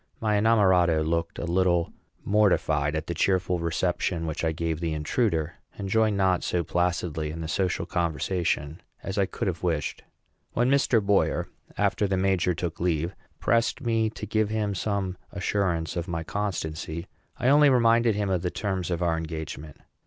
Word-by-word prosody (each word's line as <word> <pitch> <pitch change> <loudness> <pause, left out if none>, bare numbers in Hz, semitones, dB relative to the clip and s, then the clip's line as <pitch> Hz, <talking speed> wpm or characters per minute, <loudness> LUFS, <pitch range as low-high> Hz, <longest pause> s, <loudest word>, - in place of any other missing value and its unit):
My 105 -2 +1
inamorato 95 -7 +4
looked 85 +1 -1
a - - -3
little 85 -1 +1 0.3
mortified 80 -8 +2
at 80 0 -2
the 85 - -3
cheerful 90 +1 +1
reception 85 0 -1
which 80 0 -3
I 80 - +2
gave 80 0 -2
the 80 -2 -2
intruder, 80 0 -1 0.2
and 100 - -4
joined 110 -1 +2
not 95 -2 +2
so 90 -1 0
placidly 85 -2 -1
in 80 +2 -6
the 80 - -4
social 90 0 -1
conversation 85 -2 -1 0.2
as 95 +1 -3
I 95 - +2
could 115 +3 -4
have 90 -3 -2
wished. 80 -5 -1 0.5
When 120 +2 +2
Mr. 130 -5 +3
Boyer, 100 -1 +2 0.3
after 105 - +1
the 95 -1 0
major 95 -2 +1
took 85 0 -4
leave, 85 0 0 0.2
pressed 115 0 +1
me 115 -3 +1
to 105 - -7
give 110 0 0
him 105 -2 -1
some 95 -2 -2
assurance 90 -4 -1
of 85 -1 -3
my 80 -1 -3
constancy, 85 -4 -3 0.3
I 125 - +2
only 145 +1 +6
reminded 115 -3 +4
him 100 -2 -1
of 90 -2 +1
the 90 - -1
terms 95 -2 -3
of 85 0 -1
our 85 -1 +2
engagement. 80 -2 -6
90 Hz, 170 wpm, -26 LUFS, 80-105 Hz, 0.5 s, only